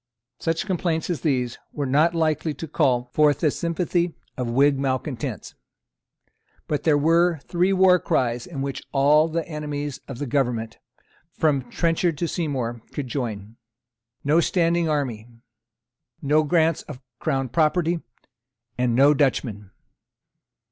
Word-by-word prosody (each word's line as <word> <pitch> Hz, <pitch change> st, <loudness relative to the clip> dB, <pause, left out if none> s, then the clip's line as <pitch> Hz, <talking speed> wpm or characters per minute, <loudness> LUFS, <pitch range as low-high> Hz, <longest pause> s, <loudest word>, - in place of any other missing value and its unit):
Such 165 Hz, +1 st, -1 dB
complaints 175 Hz, -3 st, -1 dB
as 170 Hz, -, -3 dB
these 125 Hz, -6 st, -1 dB
were 145 Hz, -, -2 dB
not 155 Hz, +6 st, +3 dB
likely 155 Hz, -1 st, 0 dB
to 165 Hz, -, -6 dB
call 125 Hz, -5 st, +1 dB
forth 150 Hz, -1 st, +3 dB
the 155 Hz, -4 st, +3 dB
sympathy 170 Hz, +1 st, -1 dB, 0.2 s
of 125 Hz, -2 st, -3 dB
the 115 Hz, -, -3 dB
Whig 140 Hz, +2 st, +4 dB
malecontents. 130 Hz, -, -3 dB, 1.1 s
But 150 Hz, -, -1 dB
there 155 Hz, -3 st, +4 dB
were 165 Hz, +3 st, +3 dB
three 180 Hz, +2 st, +1 dB
war 185 Hz, -1 st, +5 dB
cries 120 Hz, -5 st, -1 dB
in 140 Hz, -6 st, -5 dB
which 140 Hz, -1 st, -4 dB
all 145 Hz, +3 st, +4 dB
the 165 Hz, 0 st, -3 dB
enemies 145 Hz, -3 st, -4 dB
of 135 Hz, -, -7 dB
the 145 Hz, -, -3 dB
government, 120 Hz, -5 st, -1 dB, 0.5 s
from 140 Hz, -6 st, 0 dB
Trenchard 165 Hz, 0 st, 0 dB
to 170 Hz, -, -1 dB
Seymour, 130 Hz, -9 st, -3 dB
could 140 Hz, -4 st, -5 dB
join: 115 Hz, -4 st, -4 dB, 0.7 s
No 150 Hz, +4 st, +3 dB
standing 170 Hz, -1 st, +1 dB
army; 125 Hz, -7 st, -2 dB, 0.9 s
No 150 Hz, +2 st, +3 dB
grants 160 Hz, 0 st, +2 dB
of 145 Hz, -4 st, -10 dB, 0.2 s
Crown 135 Hz, -1 st, -1 dB
property; 165 Hz, +3 st, +1 dB, 0.8 s
and 125 Hz, -2 st, +1 dB
No 140 Hz, +3 st, +6 dB
Dutchmen. 120 Hz, -8 st, -1 dB
145 Hz, 135 wpm, -24 LUFS, 130-165 Hz, 1.1 s, No